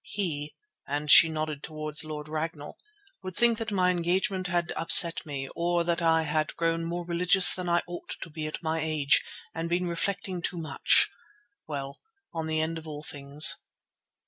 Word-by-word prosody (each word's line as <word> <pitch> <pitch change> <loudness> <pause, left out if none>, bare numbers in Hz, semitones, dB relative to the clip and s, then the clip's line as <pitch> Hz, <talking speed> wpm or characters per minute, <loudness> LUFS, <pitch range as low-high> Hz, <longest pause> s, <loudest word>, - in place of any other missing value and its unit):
He," 155 -7 -4 0.3
and 145 +1 -2
she 165 - +8
nodded 155 -2 -4
towards 155 0 -2
Lord 150 -1 -8
Ragnall, 155 -1 -6 0.5
"would 185 -1 -8
think 235 -2 +2
that 225 0 -4
my 185 -2 +1
engagement 180 +2 -2
had 175 -1 -2
upset 165 -1 +7
me, 135 -2 -5
or 175 0 0
that 170 0 -2
I 160 -1 +2
had 155 0 -2
grown 165 0 -1
rather - - -5
more 175 +1 -5
religious 180 +2 +6
than 180 -1 -4
I 170 0 +1
ought 175 0 -8
to 165 - -9
be 155 0 -5
at 155 - -8
my 160 0 -2
age, 155 -2 +2 0.3
and 165 +1 -5
been 175 +1 -1
reflecting 180 +1 -3
too 175 - -5
much—well, 155 - -2 0.3
on 160 -1 -4
the 155 0 -1
end 165 +1 -3
of 160 - -14
all 150 -1 -8
things. 145 +1 +1
165 Hz, 175 wpm, -27 LUFS, 155-175 Hz, 0.5 s, she